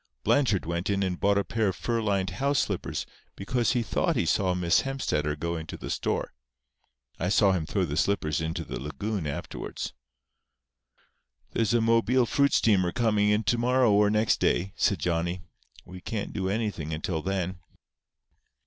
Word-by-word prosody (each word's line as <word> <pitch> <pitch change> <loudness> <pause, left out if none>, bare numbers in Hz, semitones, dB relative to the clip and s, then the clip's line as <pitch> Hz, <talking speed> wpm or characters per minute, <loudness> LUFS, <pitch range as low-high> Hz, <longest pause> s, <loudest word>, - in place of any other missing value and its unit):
Blanchard 125 -10 +2
went 85 +3 -2
in 100 -1 +1
and 90 -2 -2
bought 100 0 +3
a 100 - +2
pair 110 0 0
of 95 - -1
fur 115 -1 -1
lined 100 -3 0
house 140 +1 0
slippers - - -2 0.3
because 120 +4 0
he 120 -2 +1
thought - - 0
he - - +1
saw 95 -2 +1
Miss 90 0 +3
Hemstetter 75 - -1
go 85 +3 -3
into 80 -2 -6
the - - -6
store. - - -2 0.9
I 90 - 0
saw 100 0 +4
him 85 -5 -1
throw 95 -3 0
the 75 -3 -4
slippers 80 -4 0
into 80 +1 -3
the - - -6
lagoon 95 +4 -3
afterwards." 70 - -5 1.6
"There's 115 0 +1
a 120 - +3
Mobile 115 +2 +3
fruit 140 +4 +2
steamer 95 -5 +3
coming 105 -2 +2
in 105 +1 +2
to 120 +3 +1
morrow 125 -1 +3
or 105 0 +4
next 110 +1 +2
day," 95 +2 +1
said 100 - +2
Johnny. 85 +2 -1 0.4
"We 90 0 -10
can't 105 +1 -4
do 95 -2 -2
anything 100 -8 -2
until 80 +1 -3
then." 95 0 -2
100 Hz, 170 wpm, -27 LUFS, 85-115 Hz, 1.6 s, saw